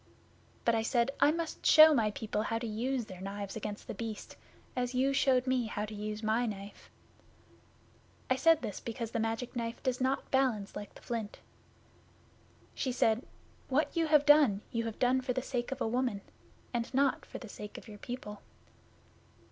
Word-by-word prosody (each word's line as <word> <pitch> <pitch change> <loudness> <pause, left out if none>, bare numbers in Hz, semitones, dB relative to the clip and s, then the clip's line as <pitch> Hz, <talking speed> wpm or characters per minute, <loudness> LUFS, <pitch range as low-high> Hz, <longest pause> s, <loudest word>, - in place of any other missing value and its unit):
But 235 - +4
I 225 - +2
said, 235 +3 +1
"I - - +6
must 330 +1 -3
show 310 0 +9
my 225 -6 +3
people 210 0 -3
how 225 +1 -1
to 235 - -4
use 235 +3 -1
their 185 -3 -10
knives 200 0 -5
against 210 -1 -5
The - - -5
Beast, 225 -2 -6 0.4
as 250 0 -1
you 270 +2 +2
showed 260 -2 +3
me 255 -3 +1
how 210 -1 -3
to 215 - -8
use 210 +1 -5
my 225 +3 +1
knife." 200 -1 -8 1.4
I 255 - +3
said 325 +3 +4
this 205 - -4
because 230 -1 -5
the 230 - -1
Magic 225 +3 -2
Knife 230 -1 -4
does 255 0 -1
not 260 +1 0
balance 250 -7 +1
like 205 -1 -7
the - - -14
flint. 225 -3 -4 1.4
She 260 - -2
said, 230 0 +2 0.5
"What 290 +7 +1
you 330 -1 +2
have 300 -2 +5
done, 290 -9 +6
you 230 0 -1
have 225 -1 -4
done 255 +1 +3
for 255 -1 -1
the 260 0 -2
sake 245 -2 -3
of 270 0 -4
a - - +1
woman, 240 -3 0 0.5
and 235 0 -2
not 275 0 +2
for - - -8
the 235 - -9
sake 210 0 -8
of - - -11
your 210 -1 -10
people." 210 -4 -7
235 Hz, 190 wpm, -32 LUFS, 215-260 Hz, 1.4 s, show